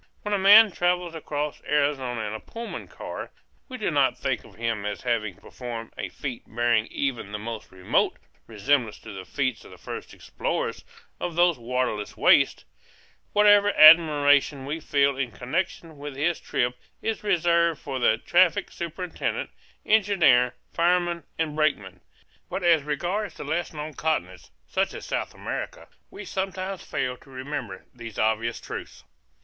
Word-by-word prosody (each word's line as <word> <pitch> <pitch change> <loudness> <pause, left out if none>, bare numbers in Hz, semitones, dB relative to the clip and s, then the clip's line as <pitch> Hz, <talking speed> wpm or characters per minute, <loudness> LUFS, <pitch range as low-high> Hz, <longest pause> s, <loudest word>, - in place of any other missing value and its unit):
When 210 - -2
a 200 - +2
man 205 +2 +8
travels 175 -1 0
across 150 -2 -4
Arizona 140 -5 0
in 105 -1 -4
a 110 - -5
Pullman 230 - -7
car, - - -7 0.4
we 255 - -6
do 210 -6 -1
not 135 -4 +2
think 135 -2 -2
of - - -16
him 115 -3 -2
as 105 -1 -4
having 110 -6 -1
performed 115 +3 -8
a - - -4
feat 130 -5 -6
bearing 120 -2 +1
even 125 -7 -3
the 105 - -3
most 110 +1 -7
remote 95 -1 0 0.3
resemblance 115 +1 0
to - - -9
the 95 -1 -8
feats 130 +1 -2
of - - -14
the - - -13
first - - -8
explorers - - -3 0.4
of 175 - -3
those 175 -4 +3
waterless 120 -3 -2
wastes; - - +4 0.7
whatever 205 0 +6
admiration 145 -3 +6
we 150 +4 -3
feel 140 -2 +2
in 130 -2 -1
connection 155 +5 -4
with 145 -1 -7
his 155 +5 0
trip 125 0 -1 0.3
is 225 -1 -2
reserved 170 -4 +2
for 135 -2 -4
the 110 -2 +3
traffic 175 +7 +3
superintendent, 170 +1 -4 0.3
engineer, 195 - +4 0.2
fireman, 175 0 +1
and 155 -2 -1
brakeman. 100 - 0 0.5
But 190 - -4
as 170 -3 +5
regards 175 +9 -2
the - - -7
less 160 +4 -2
known 150 0 -6
continents, 95 - -2 0.2
such - - -1
as - - -7
South - - -3
America, - - -5 0.2
we - - -9
sometimes 190 0 -4
fail 125 0 -2
to 135 - -20
remember 130 -6 -6
these 115 -3 -9
obvious 110 +2 0
truths. - - -8
145 Hz, 155 wpm, -25 LUFS, 120-175 Hz, 0.7 s, man